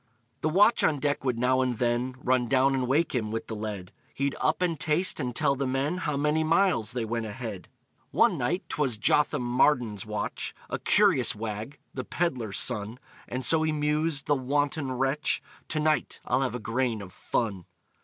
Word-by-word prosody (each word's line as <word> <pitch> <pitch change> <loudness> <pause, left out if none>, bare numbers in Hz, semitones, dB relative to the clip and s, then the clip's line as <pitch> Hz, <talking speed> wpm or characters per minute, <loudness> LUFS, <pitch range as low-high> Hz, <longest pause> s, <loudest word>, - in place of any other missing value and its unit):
The 155 - +1
watch 205 +8 +4
on 155 - +3
deck 145 0 -1
would 125 -3 0
now 130 +2 +2
and 125 -2 -1
then 120 +2 0
Run 125 -1 +2
down 135 +2 +3
and 130 -2 0
wake 150 +6 +1
him, 115 -4 -1
with 115 +1 -3
the 110 - -6
lead; 105 -4 -5 0.2
He'd 140 0 0
up, - - +1
and 165 -4 -1
taste, 160 +5 +1
and 125 -4 -3
tell 140 -1 +2
the 135 0 -2
men 135 +6 -1
How 150 -5 -2
many 150 +2 +1
miles 160 - +2
they 120 -3 -2
went 115 0 -3
ahead. 110 -4 -7 0.4
One - - +3
night, 175 +10 -1
'twas 135 -7 0
Jotham 135 +4 +2
Marden's 120 -4 +2
watch, 105 -1 -4 0.2
A - - -2
curious - - +4
wag 110 +5 -5 0.2
the 130 - -4
peddler's 125 - -2
son 110 -1 +2 0.3
And 125 +1 -4
so 160 +7 +5
he 160 0 +1
mused 150 0 0
(the 145 - +2
wanton 145 +1 0
wretch), 135 +3 0 0.3
"To 155 - -1
night 155 -3 0
I'll 130 +2 +1
have 130 -2 -1
a - - -3
grain 115 -1 -1
of 90 - -12
fun. 100 -7 -2
130 Hz, 190 wpm, -27 LUFS, 115-150 Hz, 0.4 s, so